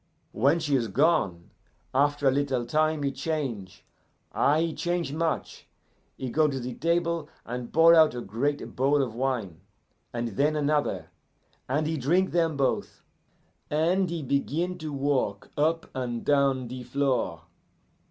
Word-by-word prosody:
"When 140 +9 +3
she 150 -4 0
is 120 -3 +1
gone, 100 - +1 0.4
after 145 +1 +2
a - - +6
little 135 -3 0
time 155 +3 +1
he 140 - 0
change 115 - -4 0.5
ah, 145 +2 +3
he 165 0 0
change 175 -4 -2
much, 160 0 -2 0.5
he 130 -2 -4
go 155 +3 +3
to 140 -2 -2
a 125 -1 -4
table 170 +1 0 0.2
and 120 0 -5
pour 165 +1 +7
out 160 -5 +6
a 120 - -4
great 130 +8 -2
bowl 140 +2 +3
of 120 -4 -4
wine, 115 -9 -2 0.5
and 120 -1 -2
then 145 +9 +1
another, 150 0 0 0.6
and 150 +4 +1
he 160 +1 -1
drink 175 +8 +2
them 165 -3 +1
both, 135 -1 -1 0.7
and 175 +5 +2
he 165 -2 -3
begin 160 +7 -1
to 155 -2 -5
walk 135 -8 -1
up 160 +3 0
and 120 -2 -4
down 140 -3 +2
the 125 +1 -7
floor. 125 -10 -1
140 Hz, 150 wpm, -27 LUFS, 125-160 Hz, 0.7 s, pour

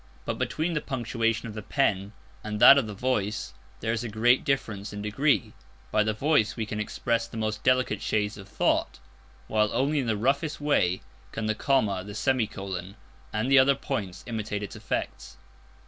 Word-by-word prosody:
But - - -3
between 165 +2 -1
the 150 - 0
punctuation 115 -3 -1
of 110 - -7
the 110 - -6
pen 100 -5 0 0.3
and 105 -1 -4
that 140 +5 +9
of 120 - -2
the 105 - -6
voice 105 -2 -1 0.3
there 115 0 0
is 115 0 -2
a 120 - -4
great 120 +4 +3
difference 110 -8 -2
in 105 0 -6
degree. 110 0 +1 0.4
By 110 - +3
the 110 +1 +1
voice 110 -1 +2
we 115 - -2
can 105 0 -4
express 115 +2 -1
the 115 - -9
most 110 0 -2
delicate 130 -5 +2
shades 105 0 0
of 100 -1 -11
thought, - - 0 0.5
while 105 -1 +2
only 140 +5 +1
in 130 - -2
the 110 -2 +1
roughest 140 +7 0
way 95 -12 +1 0.3
can 110 - -4
the 110 - +1
comma, 105 -6 +1
the 100 +1 -9
semicolon, 100 -5 -2 0.4
and 110 +5 -1
the 135 - +8
other 135 +1 +5
points, 105 -10 -4
imitate 105 -3 -3
its 100 - -7
effects. - - -4
110 Hz, 185 wpm, -27 LUFS, 105-130 Hz, 0.5 s, that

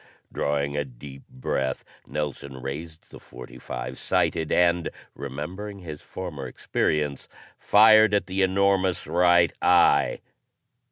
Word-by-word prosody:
Drawing 70 0 -1
a 75 - 0
deep 70 +1 -12
breath, 65 0 -3 0.2
Nelson 70 -2 -5
raised 80 +5 -8
the - - -11
.45, - - -8
sighted, 80 -2 0
and, 85 -1 +2 0.2
remembering 85 +10 -6
his 80 -6 -9
former 75 -8 -7
experience, 75 +2 -2 0.3
fired 110 0 +6
at 100 - +1
the 95 +1 -2
enormous 95 -1 +2
right 90 -1 +3
eye. 85 -5 +4
75 Hz, 110 wpm, -25 LUFS, 70-95 Hz, 0.3 s, fired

